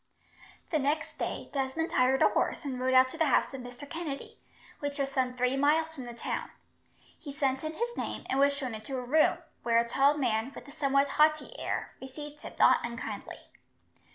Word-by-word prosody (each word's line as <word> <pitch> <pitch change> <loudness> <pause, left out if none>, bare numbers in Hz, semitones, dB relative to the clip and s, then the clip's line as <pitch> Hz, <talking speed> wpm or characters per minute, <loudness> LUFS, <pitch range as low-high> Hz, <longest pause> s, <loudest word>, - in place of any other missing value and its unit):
The 310 - +2
next 290 +3 -1
day, - - -4
Desmond 275 +4 -1
hired 260 +1 +3
a - - +6
horse - - -1
and 260 -3 -3
rode 260 0 +1
out 255 0 +7
to 325 - -10
the 320 - +4
house 265 - +2
of 265 - -5
Mr. 245 +3 -9
Kennedy, 320 -3 -6 0.4
which 285 0 -3
was 275 -1 -1
some 255 -2 0
three 250 +1 +2
miles 310 +3 +2
from 265 -5 -7
the 240 - -7
town. - - -3 0.7
He 290 - -7
sent 275 -1 0
in 310 0 -4
his 475 +4 -2
name, - - -4
and 265 - 0
was 280 +1 +5
shown 260 -4 -3
into 220 +5 -5
a 250 - -4
room, 305 +5 +4 0.2
where 230 -1 +2
a 235 0 +3
tall 275 +5 +3
man, 245 -1 0
with - - -10
a - - -11
somewhat 280 -2 +2
haughty 305 +1 +3
air, - - -3
received 295 +3 -8
him - - -8
not - - +5
unkindly. 235 0 -6
275 Hz, 205 wpm, -30 LUFS, 255-295 Hz, 0.7 s, out